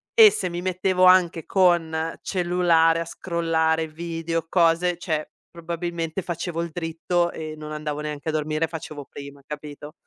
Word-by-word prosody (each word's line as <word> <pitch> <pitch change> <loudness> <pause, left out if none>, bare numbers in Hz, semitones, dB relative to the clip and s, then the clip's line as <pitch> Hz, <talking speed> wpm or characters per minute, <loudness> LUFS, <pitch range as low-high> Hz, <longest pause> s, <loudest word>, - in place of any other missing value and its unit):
E 440 -3 +9
se 180 - -2
mi 175 +1 -4
mettevo 185 0 +1
anche 180 -3 +5
con 165 -3 +2
cellulare 175 -3 +3
a 170 - -3
scrollare 165 -2 0
video, 165 +1 -4
cose, 170 0 +2
cioè 155 -4 -3 0.2
probabilmente 170 +1 -4
facevo 170 -1 -3
il 170 - -5
dritto 170 +1 -1
e 155 -1 -6
non 155 0 -8
andavo 150 -1 -4
neanche 150 0 -4
a - - +1
dormire, 155 +1 -1
facevo 155 -3 -7
prima, 140 0 -10
capito? 150 0 -8
165 Hz, 150 wpm, -24 LUFS, 155-175 Hz, 0.2 s, E